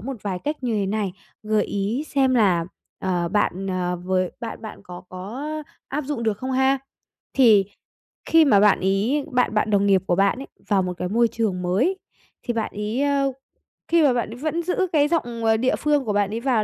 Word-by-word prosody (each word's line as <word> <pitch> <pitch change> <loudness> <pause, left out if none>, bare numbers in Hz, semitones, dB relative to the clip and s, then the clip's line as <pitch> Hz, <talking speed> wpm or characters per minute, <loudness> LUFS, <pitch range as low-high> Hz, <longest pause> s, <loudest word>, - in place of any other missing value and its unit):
một 260 +5 -5
vài 190 -3 -3
cách 300 +1 -1
như 235 -3 -1
thế 200 -2 0
này, 200 -2 -1 0.3
gợi 215 0 +1
ý 210 +9 -2
xem 265 -2 +2
là, 185 -7 +3 0.3
ờ, 175 -2 -1
bạn, 195 -1 0
ờ, 180 -1 -1
với 185 -1 0
bạn 230 -1 -6
bạn 220 - -8
có 180 -2 -9
có, 190 +7 -7
á, 305 +1 -4 0.3
áp 290 +1 -3
dụng 270 -5 -3
được 220 -2 0
không 260 +2 -3
ha. 265 +1 +3 0.6
Thì 220 -7 +5 0.6
khi 325 -1 +5
mà 205 -8 +5
bạn 210 -1 +5
ấy 205 +10 +1
bạn 250 -3 +1
bạn 210 +1 +1
đồng 200 -1 +3
nghiệp 195 -2 +4
của 175 - +2
bạn 200 +5 +2
ấy 275 - -7 0.2
vào 195 -3 +2
một 180 0 -3
cái 180 - -2
môi 235 +2 +3
trường 215 -5 -2
mới 250 - +1 0.4
thì 240 - -2
bạn 225 -2 -2
ấy, 210 +5 -2
ờ 280 -1 +1 0.6
khi 335 -2 +4
mà 270 -4 +4
bạn 240 -3 -1
ấy 230 - -8
vẫn 315 +5 -2
giữ 365 +2 0
cái 295 -1 +4
giọng, 240 -9 -2
ờ, 220 0 +4
địa 255 +3 +1
phương 295 -3 +1
của 210 - -1
bạn 205 -1 +1
ấy 225 - -2
vào 240 -5 +2
225 Hz, 220 wpm, -23 LUFS, 195-270 Hz, 0.6 s, Thì